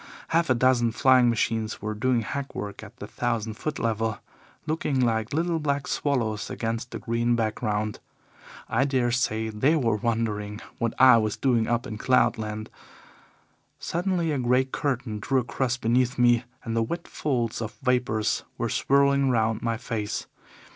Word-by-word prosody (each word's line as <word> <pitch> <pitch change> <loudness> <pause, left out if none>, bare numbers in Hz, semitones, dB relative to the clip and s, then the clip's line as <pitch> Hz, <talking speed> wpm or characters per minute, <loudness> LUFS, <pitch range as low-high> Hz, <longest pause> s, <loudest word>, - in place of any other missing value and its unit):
Half 165 -1 +2
a 130 - +4
dozen 120 -1 +3
flying 130 0 +5
machines 110 -1 -1
were 105 +1 -3
doing 120 +2 +1
hackwork 120 -6 -5
at - - -12
the - - -7
thousand 115 -2 -2
foot 150 +8 -4
level, 115 -2 -1 0.5
looking 155 -3 -1
like 115 -2 +1
little 165 +2 0
black 140 -2 -1
swallows 115 -7 -1
against 115 +2 -3
the - - -5
green 120 +1 0
background. 110 -1 -1 0.7
I - - +2
dare 130 -3 +1
say 110 -2 0
they 130 +9 +2
were 115 -8 +1
wondering 105 -2 -2 0.2
what 115 -1 -1
I 130 -3 +8
was 110 -2 0
doing 120 -4 +2
up 120 0 0
in 110 -1 -6
cloud 125 -2 +3
land. 110 0 -5 1.1
Suddenly 175 -1 -1
a 145 - -1
grey 125 +1 +3
curtain 130 -5 -2
drew 130 +5 +1
across 120 +1 -1
beneath 125 +2 +1
me 120 0 +4 0.2
and 115 -1 -3
the 115 - +2
wet 170 +10 -3
folds 120 -6 -2
of 115 0 -5
vapours 125 -4 +1
were - - -1
swirling 140 0 +3
round 110 -2 +1
my 115 -1 -1
face. 110 -3 -3
120 Hz, 160 wpm, -26 LUFS, 110-130 Hz, 1.1 s, I